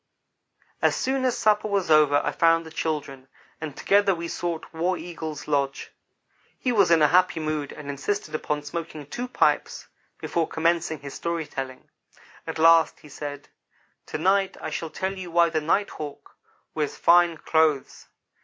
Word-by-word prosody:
As -, -, +3 dB
soon 265 Hz, 0 st, 0 dB
as 250 Hz, -2 st, +1 dB
supper 215 Hz, 0 st, +2 dB
was 200 Hz, -5 st, 0 dB
over 150 Hz, -2 st, +5 dB
I -, -, 0 dB
found 165 Hz, 0 st, +3 dB
the 160 Hz, -, -10 dB
children, 145 Hz, -5 st, -4 dB, 0.3 s
and 155 Hz, -3 st, -6 dB
together 200 Hz, -1 st, +3 dB
we 170 Hz, 0 st, -5 dB
sought 170 Hz, -1 st, -4 dB
War 175 Hz, +3 st, 0 dB
Eagle's 160 Hz, -3 st, -7 dB
lodge. 140 Hz, -2 st, -1 dB, 0.7 s
He 250 Hz, -, -1 dB
was 200 Hz, -6 st, +4 dB
in 165 Hz, -2 st, +5 dB
a 150 Hz, -, +5 dB
happy 180 Hz, -2 st, +3 dB
mood 155 Hz, -2 st, -3 dB
and 150 Hz, -, -10 dB
insisted 155 Hz, +5 st, -3 dB
upon 150 Hz, -1 st, -2 dB
smoking 155 Hz, 0 st, -6 dB
two 245 Hz, -, -5 dB
pipes 250 Hz, -, 0 dB, 0.3 s
before 165 Hz, -2 st, -1 dB
commencing 165 Hz, -2 st, 0 dB
his 140 Hz, -1 st, -8 dB
story 170 Hz, -1 st, -3 dB
telling. 135 Hz, -3 st, -7 dB, 0.6 s
At -, -, -4 dB
last 165 Hz, 0 st, +5 dB
he 150 Hz, -, -14 dB
said: 145 Hz, 0 st, -7 dB, 0.6 s
"To -, -, -4 dB
night 190 Hz, +3 st, +1 dB
I -, -, -5 dB
shall 165 Hz, -, -4 dB
tell 190 Hz, +4 st, -3 dB
you 185 Hz, -2 st, -7 dB
why 170 Hz, 0 st, +4 dB
the 160 Hz, -1 st, 0 dB
Night 195 Hz, +7 st, +1 dB
hawk 150 Hz, -2 st, -9 dB, 0.4 s
wears 150 Hz, -2 st, -2 dB
fine 175 Hz, -1 st, +4 dB
clothes. 155 Hz, -3 st, 0 dB
160 Hz, 165 wpm, -25 LUFS, 150-175 Hz, 0.7 s, over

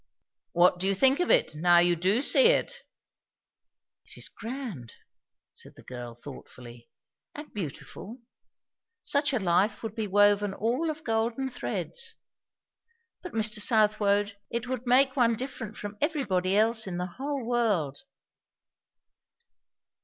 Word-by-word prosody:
"What 180 Hz, +1 st, +4 dB
do 190 Hz, -, 0 dB
you 195 Hz, -, +2 dB
think 265 Hz, -, +3 dB
of 355 Hz, -, 0 dB
it, -, -, +3 dB
now 175 Hz, +3 st, +4 dB
you 175 Hz, 0 st, +4 dB
do 190 Hz, -, +1 dB
see -, -, +6 dB
it?" 485 Hz, 0 st, +1 dB, 1.2 s
"It -, -, -12 dB
is -, -, -4 dB
grand!" 225 Hz, -, -7 dB, 0.6 s
said -, -, -8 dB
the -, -, -16 dB
girl 120 Hz, -2 st, -8 dB
thoughtfully. 120 Hz, -2 st, -12 dB, 0.5 s
"And 295 Hz, +1 st, -9 dB
beautiful. 200 Hz, -, -7 dB, 0.9 s
Such 285 Hz, +1 st, +2 dB
a 260 Hz, -, +1 dB
life 195 Hz, +2 st, +1 dB
would 220 Hz, -2 st, -4 dB
be 220 Hz, -2 st, -3 dB
woven 205 Hz, 0 st, +3 dB
all 250 Hz, +10 st, -1 dB
of 310 Hz, 0 st, -5 dB
golden 230 Hz, +3 st, -1 dB
threads. 465 Hz, -, -4 dB, 1.1 s
But 360 Hz, -, -9 dB
Mr. 215 Hz, 0 st, 0 dB
Southwode, 210 Hz, -1 st, +2 dB
it 235 Hz, +1 st, -3 dB
would 255 Hz, -1 st, -4 dB
make 260 Hz, +2 st, +4 dB
one 235 Hz, -3 st, +3 dB
different 240 Hz, -3 st, -6 dB
from 205 Hz, 0 st, -7 dB
everybody 205 Hz, -, 0 dB
else 220 Hz, 0 st, +2 dB
in 175 Hz, -2 st, -4 dB
the 180 Hz, -, -2 dB
whole 270 Hz, +7 st, -5 dB
world!" 215 Hz, -, 0 dB
215 Hz, 135 wpm, -28 LUFS, 185-260 Hz, 1.2 s, see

